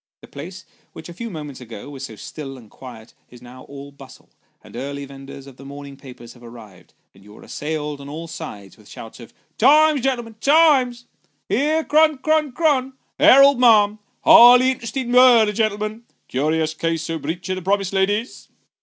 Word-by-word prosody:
The - - -15
place, 180 +6 -11 0.3
which - - -11
a - - -9
few 230 +6 -7
minutes 150 -7 -9
ago 115 -2 -11
was 135 -1 -8
so 110 - -12
still 135 +5 -9
and 115 -4 -17
quiet, 120 -4 -13 0.2
is 125 - -16
now 125 +1 -14
all 140 0 -11
bustle; 140 -1 -17 0.3
the - - -10
early 140 +1 -6
vendors 135 0 -12
of 135 -2 -15
the 135 - -14
morning 140 0 -11
papers 125 -4 -14
have 120 - -20
arrived, 110 -6 -15 0.2
and 95 - -21
you 105 +1 -16
are - - -16
assailed 150 -1 -6
on 140 - -11
all 160 +3 -8
sides 105 - -10
with 105 -2 -20
shouts 115 +2 -12
of 115 - -13 0.2
" - - -46
Times, 300 +3 +4
gen'lm'n, 240 -4 -4
Times," 275 -5 +2 0.2
" - - -47
Here's 310 +3 0
Chron 310 -1 +3
Chron 310 +1 0
Chron," 270 -2 0
" - - -49
Herald, 275 0 +6
ma'am," 215 -4 +4
" - - -46
Highly 250 +2 +7
interesting 255 0 -5
murder, 245 -4 +5
gen'lm'n," 215 +1 -3
" - - -48
Curious 155 +4 -1
case 165 0 -3
o' 165 - -4
breach 165 +6 -6
o' 185 0 -4
promise, 195 +1 -1
ladies." 205 +5 -2
165 Hz, 190 wpm, -20 LUFS, -, 0.3 s, Highly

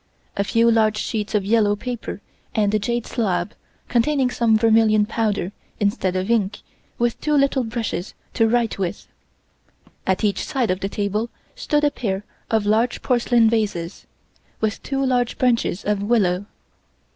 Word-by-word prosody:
A 200 - +1
few 230 +3 +3
large 215 -1 +3
sheets 215 0 -2
of 200 -2 +1
yellow 210 -1 +3
paper 240 +2 -5 0.3
and 210 -2 +2
a 215 - +3
jade 235 +3 -2
slab, 195 -4 -1 0.3
containing 255 +1 +2
some 225 -3 +3
vermilion 220 -1 +4
powder 210 -4 -1 0.3
instead 200 -3 0
of 185 +4 -1
ink, 210 -2 0 0.4
with 240 0 0
two 300 - 0
little 275 -2 +2
brushes 225 -5 -4 0.2
to 225 -2 +3
write 235 -3 +1
with. 180 -3 -3 1.0
At 190 +3 +1
each 205 -2 +1
side 260 -9 0
of 185 - -1
the 195 - -3
table 210 +3 -2 0.2
stood 300 -12 0
a 295 - +3
pair 200 -6 -3 0.2
of 220 -2 +1
large 225 +4 +1
porcelain 240 -2 +3
vases, 205 -6 -1 0.5
with 220 -1 -1
two 275 -1 -1
large 245 -2 +1
branches 235 -7 +1
of 210 -1 0
willow. 200 -3 +1
220 Hz, 155 wpm, -22 LUFS, 205-240 Hz, 1.0 s, vermilion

